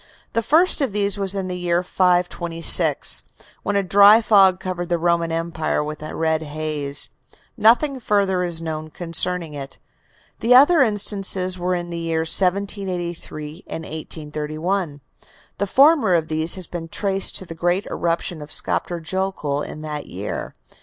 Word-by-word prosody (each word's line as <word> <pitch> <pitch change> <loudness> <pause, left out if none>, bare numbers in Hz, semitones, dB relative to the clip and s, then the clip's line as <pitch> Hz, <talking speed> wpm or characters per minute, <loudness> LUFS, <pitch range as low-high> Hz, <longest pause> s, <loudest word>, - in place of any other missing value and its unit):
The 230 - +1
first 315 - +3
of 265 -7 -1
these 205 -1 +1
was 195 0 +3
in 190 -1 -3
the 180 - -4
year 175 0 0
526, 175 -2 +2 0.4
when 205 - -2
a 200 - +2
dry 200 +3 +7
fog 195 -4 +4
covered 180 -2 -5
the 175 - +1
Roman 170 0 0
Empire 165 -2 -2
with 150 0 -7
a 155 - -7
red 160 -1 0
haze. 150 -2 -2 0.4
Nothing 250 +5 +3
further 200 -5 0
is 170 -2 -1
known 155 -1 -5
concerning 170 0 -2
it. 140 -1 -8 0.6
The 240 +2 +4
other 290 +5 +6
instances 195 -5 0
were 180 +1 -1
in 175 0 -5
the 170 - -4
years 165 -1 -2
1783 180 -4 -2
and 160 - -6
1831. 155 +1 -4 0.6
The 200 - 0
former 270 - +4
of 160 -2 -1
these 160 +1 +3
has 185 -2 -1
been 165 0 -7
traced 195 +2 0
to 190 - -4
the 165 - -8
great 175 +4 -1
eruption 170 -1 -3
of 150 - -10
Skaptur 175 -1 0
Jokull 165 -4 -2
in 155 - -7
that 150 -1 -6
year. 95 +3 -6
175 Hz, 155 wpm, -21 LUFS, 160-195 Hz, 0.6 s, dry